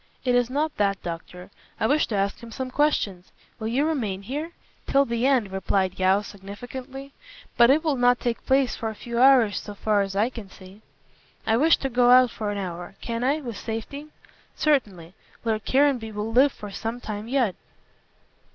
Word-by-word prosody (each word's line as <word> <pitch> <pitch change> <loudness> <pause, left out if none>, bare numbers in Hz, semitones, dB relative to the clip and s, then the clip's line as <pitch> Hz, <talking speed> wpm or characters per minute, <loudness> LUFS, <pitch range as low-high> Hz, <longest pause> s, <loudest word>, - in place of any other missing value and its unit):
"It 250 - +2
is 245 -1 +2
not 300 +3 -1
that, 200 -2 +1
doctor. 180 +2 -7 0.3
I - - +1
wish 290 +6 +2
to 220 - -3
ask 200 0 -1
him 235 -1 -11
some 255 +3 -5
questions. 205 -11 0 0.3
Will 220 - -3
you 260 +6 +1
remain 220 -12 -2
here?" 295 +9 -5 0.3
"Till 275 0 +3
the 235 +1 0
end," 245 -8 +2
replied 190 -1 -1
Yeo, 190 +2 +3
significantly; 245 +8 -9 0.4
"but 235 0 +6
it 300 +4 +4
will 305 -4 0
not 245 0 +3
take 240 -1 -2
place 265 -1 +2
for 225 - -3
a 220 - -7
few 235 +2 -4
hours, 255 -6 +5
so 205 - -9
far 210 0 +1
as 195 0 -3
I 220 +5 +1
can 225 -6 -9
see." 190 +3 -15 0.6
"I 220 - +2
wish 315 +7 +4
to 270 - -3
go 245 0 +3
out 250 -1 +7
for 215 -2 -4
an 205 - -3
hour. 180 -1 -6
Can 230 0 -4
I, 285 +4 +1
with 235 -6 -6
safety?" 230 +8 -6 0.5
"Certainly. 200 - 0 0.3
Lord 220 -2 -1
Caranby 260 -5 +2
will 210 +1 -4
live 270 +4 +5
for 210 -3 -9
some 225 +4 -4
time 215 -2 -6
yet." 245 -6 +1
230 Hz, 190 wpm, -25 LUFS, 200-265 Hz, 0.6 s, out